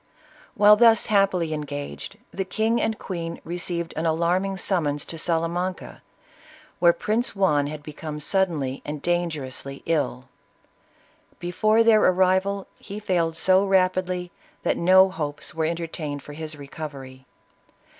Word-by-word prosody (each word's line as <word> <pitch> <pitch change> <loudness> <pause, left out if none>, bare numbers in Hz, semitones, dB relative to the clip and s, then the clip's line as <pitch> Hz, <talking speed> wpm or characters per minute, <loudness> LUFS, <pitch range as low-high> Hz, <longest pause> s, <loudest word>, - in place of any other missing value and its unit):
While 210 +1 +7
thus 225 -1 +5
happily 190 -6 +2
engaged 145 -1 -6
the 195 - -2
king 220 +5 0
and 220 0 -1
queen 170 -3 -5
received 170 0 -3
an 165 +1 -1
alarming 175 +4 +1
summons 155 -7 0
to 165 - -6
Salamanca, 170 +3 -2 0.8
where 170 -1 +6
Prince 220 +7 -1
Juan 150 -8 +2
had 150 0 -7
become 150 0 -7
suddenly 150 -6 -1
and 150 0 -5
dangerously 150 -6 -3
ill; 145 -5 -1 1.1
before 215 +6 +2
their 225 -2 +5
arrival, 190 +1 +2
he 205 +1 -8
failed 170 -5 0
so 190 +2 +4
rapidly 185 -2 +1 0.3
that - - +1
no 185 +2 +6
hopes 145 -4 -4
werq 160 0 -1
entertained 160 -4 -5
for 145 - -10
his 155 0 -6
recovery. 140 -3 -9
170 Hz, 125 wpm, -24 LUFS, 150-190 Hz, 1.1 s, While